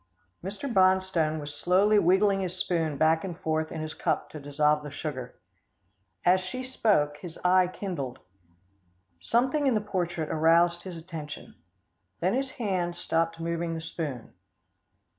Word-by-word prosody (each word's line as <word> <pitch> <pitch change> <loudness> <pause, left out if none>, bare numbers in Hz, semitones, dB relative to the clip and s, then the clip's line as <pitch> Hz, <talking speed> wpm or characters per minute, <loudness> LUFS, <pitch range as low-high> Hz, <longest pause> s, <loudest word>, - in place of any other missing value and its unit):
Mr. 205 +10 -5
Bonstone 185 - +3
was 145 0 -6
slowly 190 +7 +3
wiggling 195 +2 +4
his 185 -1 -3
spoon 165 -5 0
back 160 +1 +3
and 180 -4 -5
forth 160 0 -1
in 160 - -4
his 155 0 -5
cup - - -1
to 155 - -7
dissolve 150 +1 +1
the 150 - -7
sugar. 140 -3 -5 0.9
As 185 +1 +5
she 185 +8 -5
spoke, 205 - +1
his 165 0 -9
eye 185 0 +5
kindled. 170 -9 -5 1.0
Something 260 - +1
in 255 - +3
the - - +3
portrait 175 -6 -2
aroused 170 +2 +4
his 180 -3 -6
attention. 160 -3 -8 0.7
Then 185 +3 +1
his 270 +1 0
hand 185 -6 -1
stopped 165 -1 -1
moving 165 0 -2
the - - -3
spoon. 150 -7 -5
170 Hz, 145 wpm, -28 LUFS, 155-190 Hz, 1.0 s, As